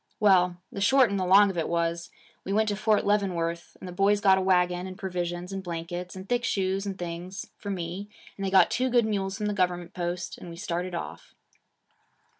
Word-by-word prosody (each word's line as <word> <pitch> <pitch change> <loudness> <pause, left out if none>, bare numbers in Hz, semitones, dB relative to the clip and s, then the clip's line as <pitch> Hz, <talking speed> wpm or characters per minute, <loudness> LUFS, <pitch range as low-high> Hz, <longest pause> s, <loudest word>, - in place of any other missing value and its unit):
Well, 180 -4 +4
the 200 - -5
short 250 +2 +5
and 200 - 0
the 185 - -1
long 200 +2 +6
of 175 - -3
it 160 - -2
was, 170 0 -1 0.3
we 195 - -5
went 215 +1 +2
to 205 - 0
Fort 210 +1 +2
Leavenworth, 175 -5 -1
and - - -8
the - - -6
boys 195 +3 +2
got 190 -2 +5
a - - -1
wagon 180 -1 +2
and 185 0 -8
provisions 180 -1 -4
and 195 - -3
blankets 175 +1 -5
and 190 +1 -8
thick 245 -1 0
shoes 195 -2 0
and 195 -1 -4
things 175 +2 -6
for 205 - -6
me, 185 +2 -4 0.3
and 195 - -6
they 195 - 0
got 190 0 +5
two 255 +1 +1
good 240 -2 +3
mules 195 -2 -2
from 210 - -3
the 210 - 0
government 180 -2 -1
post, 175 -1 -4
and 175 - -9
we 170 - -8
started 175 -1 -3
off.' 170 - -7
185 Hz, 220 wpm, -27 LUFS, 175-200 Hz, 0.3 s, long